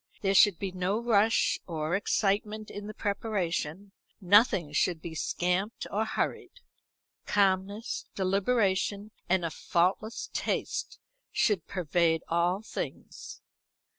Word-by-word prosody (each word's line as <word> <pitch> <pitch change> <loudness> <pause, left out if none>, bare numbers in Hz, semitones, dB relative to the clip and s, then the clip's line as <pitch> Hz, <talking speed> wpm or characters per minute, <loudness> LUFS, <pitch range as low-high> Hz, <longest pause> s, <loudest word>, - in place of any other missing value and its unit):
There 195 0 +2
should 195 -2 +6
be 195 +1 -3
no 185 +3 -1
rush 225 -2 +3
or 160 0 -1
excitement 210 +1 0
in 205 0 -7
the 215 - -6
preparation; 195 -3 -2 0.3
nothing 195 - +4
should 170 +1 +1
be 165 +1 -7
scamped 180 +6 -1
or 215 +2 0
hurried. - - -3 0.7
Calmness, 200 +2 0
deliberation, 200 +1 +1 0.2
and 180 -1 +2
a 165 - -2
faultless 185 +9 -1
taste - - -2 0.3
should 200 -6 +1
pervade 170 -2 +1
all 175 +4 +1
things. - - -7
195 Hz, 110 wpm, -29 LUFS, 175-210 Hz, 0.7 s, should